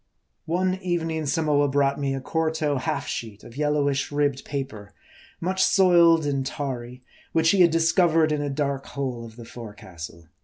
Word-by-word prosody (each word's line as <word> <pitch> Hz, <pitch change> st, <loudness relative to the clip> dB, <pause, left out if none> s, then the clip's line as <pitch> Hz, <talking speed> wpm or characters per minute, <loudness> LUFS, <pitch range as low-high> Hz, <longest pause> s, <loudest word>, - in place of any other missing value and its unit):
One 185 Hz, +3 st, 0 dB
evening 165 Hz, -3 st, -2 dB
Samoa 145 Hz, -1 st, +2 dB
brought 140 Hz, 0 st, +1 dB
me 135 Hz, -1 st, -1 dB
a -, -, -3 dB
quarto 160 Hz, -1 st, -1 dB
half 145 Hz, +1 st, -2 dB
sheet 110 Hz, -6 st, -6 dB
of 115 Hz, -, -13 dB
yellowish, 145 Hz, -1 st, 0 dB
ribbed 145 Hz, -2 st, 0 dB
paper, 130 Hz, -8 st, -6 dB, 0.4 s
much 185 Hz, +2 st, 0 dB
soiled 170 Hz, -4 st, +5 dB
and 140 Hz, -2 st, 0 dB
tarry, 125 Hz, -3 st, -5 dB, 0.3 s
which 165 Hz, 0 st, +4 dB
he 195 Hz, -, +3 dB
had 175 Hz, -, +7 dB
discovered 165 Hz, -1 st, +3 dB
in 150 Hz, -1 st, 0 dB
a 145 Hz, -, -2 dB
dark 140 Hz, -1 st, -2 dB
hole 130 Hz, -4 st, -4 dB
of 115 Hz, -1 st, -11 dB
the 120 Hz, -1 st, -10 dB
forecastle. 90 Hz, -8 st, -10 dB
145 Hz, 160 wpm, -25 LUFS, 130-160 Hz, 0.4 s, had